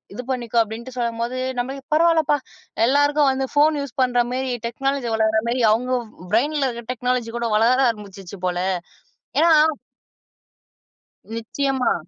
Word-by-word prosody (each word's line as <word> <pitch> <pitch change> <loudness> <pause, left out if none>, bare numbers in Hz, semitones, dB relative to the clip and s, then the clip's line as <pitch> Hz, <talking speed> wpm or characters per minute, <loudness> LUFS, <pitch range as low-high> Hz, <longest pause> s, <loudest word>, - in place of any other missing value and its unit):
இது 250 - -4
பண்ணிக்கோ" 240 -2 0
அப்படின்னு 235 +4 -8
சொல்லும்போது, 235 +1 -2 0.2
நம்பளு 265 +3 -4
பரவால்லப்பா, 320 -3 +3 0.5
எல்லாருக்கும் 290 +1 +3
வந்து 265 0 -2
போன் 300 0 +4
யூஸ் 280 0 -7
பண்ற 245 -1 +2
மாரி 260 0 -2
டெக்னாலஜி 270 +1 -2
வளர்ற 220 0 +2 0.2
மாரி - - 0
மாரி, 250 - 0
அவுங்க 250 +3 -1 0.4
பிரைன்ல 290 +6 +2
இருக்கற 235 -2 -6
டெக்னாலஜி 250 -1 -1
கூட 235 - -1
வளர 240 +4 +3
ஆரம்பிச்சுச்சு 200 -3 -7
போல. 180 -1 -1 0.8
ஏன்னா 335 0 +5 1.8
நிச்சயமா. 260 +2 0
250 Hz, 130 wpm, -22 LUFS, 230-275 Hz, 1.8 s, ஏன்னா